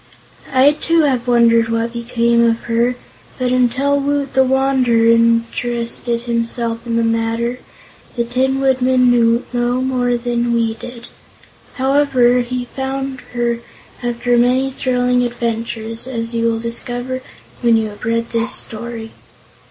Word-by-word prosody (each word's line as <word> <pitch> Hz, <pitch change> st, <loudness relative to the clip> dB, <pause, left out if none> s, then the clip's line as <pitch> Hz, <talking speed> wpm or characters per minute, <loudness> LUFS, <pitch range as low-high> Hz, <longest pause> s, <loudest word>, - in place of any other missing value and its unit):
I, 265 Hz, +3 st, +5 dB
too, 330 Hz, +2 st, +1 dB
have 255 Hz, -4 st, 0 dB
wondered 230 Hz, -1 st, +4 dB
what 230 Hz, +1 st, -1 dB
became 235 Hz, 0 st, +1 dB
of 230 Hz, 0 st, +1 dB
her, 235 Hz, +1 st, 0 dB, 0.4 s
but 250 Hz, -1 st, -1 dB
until 255 Hz, +3 st, +2 dB
Woot 280 Hz, 0 st, -1 dB
the 265 Hz, -, +4 dB
Wanderer 260 Hz, -3 st, +2 dB
interested 230 Hz, +1 st, 0 dB
himself 235 Hz, 0 st, -2 dB
in 230 Hz, -, -1 dB
the 230 Hz, -, +2 dB
matter 230 Hz, +2 st, -1 dB, 0.6 s
the 235 Hz, -, 0 dB
Tin 260 Hz, +3 st, 0 dB
Woodman 255 Hz, -1 st, +3 dB
knew 235 Hz, 0 st, +2 dB
no 245 Hz, +1 st, 0 dB
more 250 Hz, -2 st, 0 dB
than 240 Hz, 0 st, -1 dB
we 230 Hz, -1 st, +1 dB
did. 235 Hz, +1 st, -10 dB, 0.7 s
However, 265 Hz, -2 st, +3 dB
he 245 Hz, 0 st, -3 dB
found 270 Hz, +1 st, -4 dB, 0.2 s
her, 235 Hz, -1 st, 0 dB, 0.4 s
after 240 Hz, 0 st, 0 dB
many 255 Hz, +2 st, +2 dB
thrilling 250 Hz, -1 st, 0 dB
adventures, 230 Hz, -1 st, -3 dB
as 230 Hz, -2 st, -1 dB
you 230 Hz, 0 st, +1 dB
will 225 Hz, -1 st, 0 dB
discover 245 Hz, +2 st, -4 dB, 0.4 s
when 235 Hz, -2 st, +4 dB
you 220 Hz, -1 st, -1 dB
have 205 Hz, -, -13 dB
read 230 Hz, +1 st, -1 dB
this 230 Hz, +2 st, +3 dB
story. 225 Hz, 0 st, -3 dB
240 Hz, 135 wpm, -17 LUFS, 230-255 Hz, 0.7 s, I